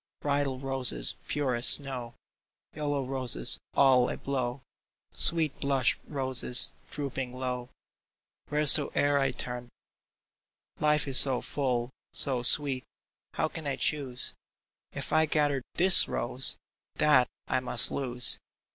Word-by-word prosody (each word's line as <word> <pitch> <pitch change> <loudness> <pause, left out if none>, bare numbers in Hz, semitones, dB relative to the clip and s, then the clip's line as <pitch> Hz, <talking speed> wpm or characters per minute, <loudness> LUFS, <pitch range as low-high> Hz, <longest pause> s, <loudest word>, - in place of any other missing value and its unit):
Bridal 140 -2 -3
roses 130 - +1
pure 140 -3 -3
as 120 +1 +1
snow. 125 -4 +2 0.6
Yellow 145 -3 -4
roses 130 - +3 0.2
all 130 -3 +2
a - - -6
blow, 130 -1 -5 0.5
Sweet 160 -4 -1
blush 135 -3 -1
roses 130 -3 +2 0.2
drooping 135 -3 -7
low, 125 -1 -6 0.8
Wheresoe'er 145 -1 +3
I 135 -1 -1
turn! 125 -1 -7
CHOOSING 120 - -39
319 - - -9
Life 150 -1 +1
is 135 -2 +6
so 130 -3 +4
full, 125 -3 -4 0.2
so 130 -3 -3
sweet 130 +1 +6 0.3
— - - -67
How - - -2
can 160 -1 -10
I 140 - -3
choose? 135 -3 -1 0.6
If - - -8
I 160 0 +1
gather 145 -3 -2
this 185 +2 +4
rose, 125 +2 0 0.4
That 150 -4 +2 0.2
I - - -2
must 125 - +2
lose 125 -3 +2
135 Hz, 130 wpm, -26 LUFS, 125-145 Hz, 0.8 s, is